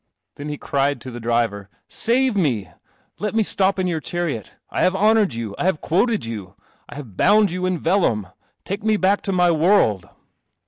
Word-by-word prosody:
Then 145 +1 -7
he 150 - -4
cried 140 0 0
to 130 - -8
the 120 - -7
driver, 115 -4 -1
" - - -56 0.2
Save 250 0 +3
me! 130 - 0 0.5
Let 210 +1 -3
me 225 - +3
stop 195 -1 +1
in 185 - 0
your 170 -3 -1
chariot. 155 - -4 0.2
I - - -1
have 185 - +3
honoured 210 - +3
you. 115 -3 -4
I - - -1
have 185 -5 +1
quoted 205 - +1
you. 100 -5 -7 0.3
I - - -10
have 130 -10 -9
bound 205 - +4
you 185 +1 -2
in 185 -1 0
vellum. 160 - +1 0.4
Take 200 +2 -4
me 215 -1 +2
back 200 +1 +2
to 195 - -2
my 180 -2 +3
world." 160 - +2
175 Hz, 195 wpm, -21 LUFS, 120-200 Hz, 0.5 s, bound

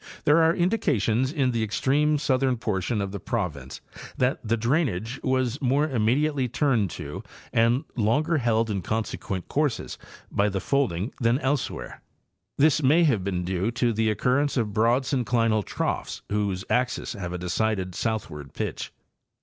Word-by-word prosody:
There 155 +2 +5
are 165 +1 +4
indications 135 - +1
in 135 -5 +1
the 115 -2 -1
extreme 140 +8 +1
southern 130 -3 +1
portion 105 0 -1
of 100 -1 -3
the 100 - -5
province 85 - -4 0.4
that 130 +1 +1
the 115 +1 0
drainage 120 - 0
was 130 0 0
more 140 +3 +2
immediately 135 +2 +1
turned 120 -5 +1
to 75 +1 -6 0.3
and 115 +5 +3
longer 145 +9 +1
held 115 -2 +1
in 100 -2 -2
consequent 100 -2 -3
courses 145 -4 -1 0.3
by 105 +1 +2
the 95 -1 -2
folding 115 -5 0
than 115 +1 +3
elsewhere. 140 -1 -3 0.6
This 155 +1 +4
may 150 +5 +4
have 120 - +2
been 90 -2 -2
due 95 +3 -1
to 120 0 +1
the 110 0 +1
occurrence 130 +6 +1
of 110 -4 0
broad 115 +5 +3
synclinal 115 -4 +1
troughs - - -3
whose 100 -3 -1
axes 125 0 0
have 90 -5 -5
a 90 - -3
decided 95 +1 -1
southward 85 - -4
pitch. - - -4
115 Hz, 150 wpm, -25 LUFS, 105-135 Hz, 0.6 s, There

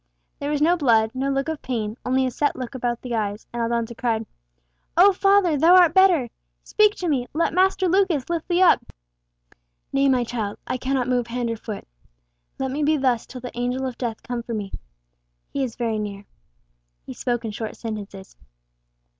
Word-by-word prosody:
There 285 - -3
was 295 0 +1
no 345 +3 +4
blood, 225 -7 +3
no 265 +1 -1
look 275 +1 -1
of 320 -2 -3
pain, 220 -4 -3
only 260 +1 +1
a 255 - -1
set 290 +3 0
look 255 0 -6
about 245 -2 -3
the 250 -2 -4
eyes; 210 -2 -2
and 240 - -2
Aldonza 235 0 -1
cried 225 -2 -1 0.7
"Oh, 390 +3 +7
father, 390 -4 +3
thou 330 +5 +6
art 350 -3 +6
better! 360 -10 +4 0.3
Speak 425 -1 +3
to 360 - -4
me! 260 -6 0
Let 325 +1 0
Master 375 +1 +3
Lucas 355 -7 +2
lift 335 -2 -3
thee 355 +1 +3
up!" 360 - +5 1.1
"Nay, 275 0 +3
my 255 -2 +3
child. 225 -4 -4
I 255 - -2
cannot 260 0 -1
move 245 -2 0
hand 235 0 -2
or - - -2
foot. 215 -2 -7 0.7
Let 265 -1 -2
me 290 +3 -2
be 305 +1 +3
thus 255 -4 0
till 255 - -9
the 250 - -8
Angel 250 +2 -1
of 255 -2 -4
Death 235 -3 -4
come 245 -1 -4
for 235 -1 -5
me. 205 -2 -4 0.8
He 275 - 0
is 245 -4 -4
very 225 -3 -1
near." 205 -1 -5 0.8
He - - -7
spoke 240 -1 -2
in 220 - -3
short 220 +1 -5
sentences. 205 -4 -7
255 Hz, 195 wpm, -23 LUFS, 230-305 Hz, 1.1 s, Oh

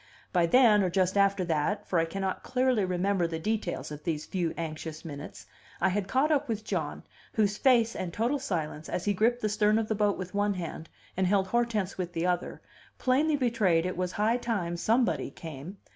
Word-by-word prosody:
By 175 -2 +3
then, 220 0 +6
or 185 - +1
just 185 +1 +1
after 200 -2 +3
that 165 +5 -1
(for 175 - +2
I 165 - +2
cannot 190 +3 -3
clearly 255 -4 +1
remember 185 0 +1
the 165 -1 -4
details 205 -2 -2
of 150 0 -8
these 155 -2 -2
few 175 -4 -1
anxious 160 -1 -5
minutes), 145 -2 -8 0.3
I 190 - +3
had 195 +1 -1
caught 275 +7 +2
up 290 -3 +1
with 220 -1 -2
John, 165 -8 -3 0.3
whose 205 -2 +2
face, 235 -4 +4
and 185 -2 -3
total 235 +10 0
silence, 160 - -3
as 180 - -3
he 205 - +2
gripped 235 +5 +1
the - - +3
stern 210 0 +3
of 225 -1 -1
the - - +2
boat 205 -1 +1
with 185 0 -6
one 205 0 +1
hand 165 -2 -6 0.3
and 185 0 +1
held 190 0 +2
Hortense 220 -5 0
with 175 -1 -3
the 165 0 -1
other, 180 -1 -1 0.4
plainly 290 +4 +2
betrayed 210 -11 +2
it 185 - -2
was 180 0 -2
high 220 +3 +2
time 205 -8 -2
somebody 230 +7 +1
came. 160 +4 -9
195 Hz, 205 wpm, -29 LUFS, 170-220 Hz, 0.4 s, then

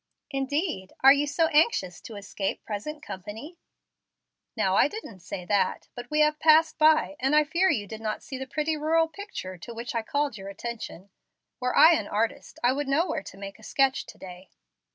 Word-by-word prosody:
"Indeed, 275 - -2
are 270 +1 +9
you 285 +1 0
so 325 +3 +2
anxious 295 - +2
to 225 - -10
escape 200 -1 -4
present 295 +9 -5
company?" 225 - -8 1.0
"Now - - +2
I - - +5
didn't 415 - -9
say 180 +1 -7
that. 200 -1 0
But 245 0 -9
we 300 0 +2
have 300 0 +3
passed 315 +1 +4
by, 310 -1 +4
and 270 +3 +2
I 305 - +6
fear 340 +5 +2
you 205 - 0
did 220 +2 -8
not 215 -1 -3
see 265 -3 -7
the 265 - -5
pretty 310 +3 -1
rural 320 +2 +2
picture 320 - -8
to 230 +8 -9
which 235 +1 -5
I 230 - 0
called 285 -1 -2
your 195 +1 -7
attention. 200 -3 -7 0.5
Were 250 0 -1
I 320 +3 +9
an 215 -10 -1
artist 220 +2 -2
I 245 +1 +4
would 290 +1 -3
know 290 +5 +2
where 350 - -2
to 195 - -12
make 195 +1 -8
a - - -17
sketch 270 +3 +1
to - - -12
day." 185 0 -11
265 Hz, 200 wpm, -27 LUFS, 205-305 Hz, 1.0 s, are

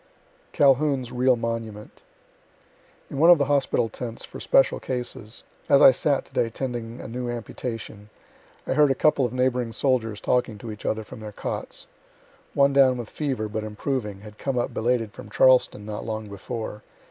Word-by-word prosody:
CALHOUN'S 135 -2 +3
REAL 125 0 +3
MONUMENT 115 -2 -5 1.1
In 140 - -4
one 165 +3 +6
of 175 - +9
the 140 - +1
hospital 140 -4 +1
tents 115 0 -7
for - - -10
special 135 - +3
cases, 125 -3 -5 0.3
as 140 - +6
I - - +9
sat 140 +2 0
to - - -19
day 115 - +1
tending 120 -1 -5
a - - -7
new 120 +2 -4
amputation, 115 -3 -6 0.6
I - - -1
heard 150 +1 +5
a 135 - +2
couple 145 -1 +3
of 120 - -2
neighboring 125 -2 0
soldiers 115 -6 0
talking 125 -3 0
to 110 +2 -7
each 105 - -7
other 110 0 -1
from 105 - -11
their 110 -1 -7
cots. - - -5 0.7
One 140 0 +4
down 130 -2 +5
with 120 -3 -7
fever, 135 -8 -2
but 110 0 -4
improving, 105 -1 -3
had 105 0 -13
come 135 -2 -2
up 120 - -1
belated 115 -2 0
from 105 - -11
Charleston 125 -3 +4
not 105 -1 -5
long 110 -1 -5
before. 105 +2 -6
120 Hz, 175 wpm, -25 LUFS, 110-130 Hz, 1.1 s, of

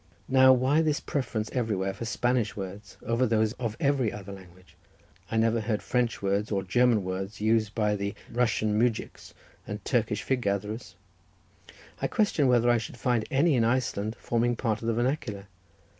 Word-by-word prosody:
Now, 130 0 +6
why 130 +5 +3
this 155 -2 +1
preference 115 -6 -3
everywhere 105 -6 -1
for 115 - -6
Spanish 120 0 0
words, 100 +1 -8
over 115 +3 +1
those 110 -1 +1
of 115 -3 -3
every 140 -7 +1
other 100 -1 -8
language? 95 -1 -14 0.5
I 110 - -1
never 115 0 +2
heard 110 -1 -2
French 120 -4 -1
words 100 +2 0
or 100 -2 0
German 115 +2 +3
words 95 +3 -4
used 110 -1 +1
by 105 -2 0 0.2
Russian 110 -3 +1
mujiks 115 -1 -2 0.3
and - - -6
Turkish - - 0
fig 130 -2 0
gatherers. 105 +2 -3 1.1
I - - +1
question 190 - +2
whether 120 -1 +4
I 120 - +3
should 115 - -8
find 120 -2 0
any 145 +4 +3
in 120 -3 +3
Iceland 115 -3 0
forming 120 +1 0
part 110 -2 -1
of 115 - -4
the 115 - +2
vernacular. 120 -5 -2
115 Hz, 165 wpm, -28 LUFS, 105-125 Hz, 1.1 s, Now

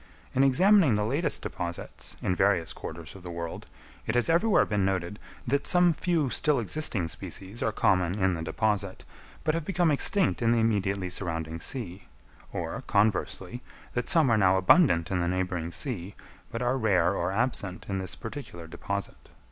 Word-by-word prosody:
In 130 - +3
examining 165 - +5
the 105 0 0
latest 145 +7 0
deposits, 85 0 -6
in - - +1
various 90 -3 +1
quarters 80 -1 -8
of 95 - -12
the 90 - -8
world, 85 -1 -6 0.4
it 110 - -1
has 120 +6 +3
everywhere 195 +6 +4
been 105 -3 0
noted, 95 +1 -2 0.3
that 140 +3 0
some 180 -1 +5
few 160 -4 0
still 150 -2 +2
existing 115 - 0
species 95 +6 -6
are 110 - +1
common 90 -2 +1
in 95 -2 +2
the 80 - -4
deposit, 100 +3 -2 0.4
but 155 - +1
have 165 0 -2
become 175 -1 +1
extinct 185 +2 +2
in 115 0 +3
the - - +2
immediately 100 -4 0
surrounding 80 -3 -3
sea; 95 -4 -4 0.5
or, - - -4
conversely, 100 +2 0 0.3
that 120 0 -2
some 155 -7 +4
are 110 - +4
now 95 -1 +4
abundant 95 - +4
in 95 - 0
the 85 - 0
neighbouring 90 -2 -2
sea, 100 - -2 0.4
but 115 +1 -3
are 125 +2 +1
rare 95 -5 +2
or 90 -1 -1
absent 100 -4 -2
in 95 -1 -2
this 95 - -2
particular 115 - -8
deposit. 100 +4 -6
100 Hz, 170 wpm, -28 LUFS, 90-130 Hz, 0.5 s, examining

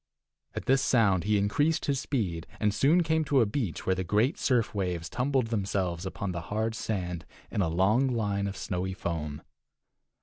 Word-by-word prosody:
At - - -4
this 135 +1 +4
sound 100 -10 +3
he 105 0 +3
increased 145 +11 +1
his 140 -2 +1
speed, 95 - -2
and 105 -1 +2
soon 145 - +4
came 160 0 +1
to 140 -2 +3
a 115 - +5
beach 105 - -3
where 95 - +3
the 95 0 -2
great 105 - +1
surf 120 -5 +1
waves 90 -4 -2
tumbled 130 -2 0
themselves 95 -4 -1
upon 95 +1 -4
the 85 -1 -4
hard 110 +2 0
sand 90 -6 -3 0.3
in - - 0
a 85 - +1
long 100 +10 +3
line 100 -5 0
of 100 - -5
snowy 95 0 -3
foam. 75 -5 -4
100 Hz, 180 wpm, -29 LUFS, 90-125 Hz, 0.3 s, a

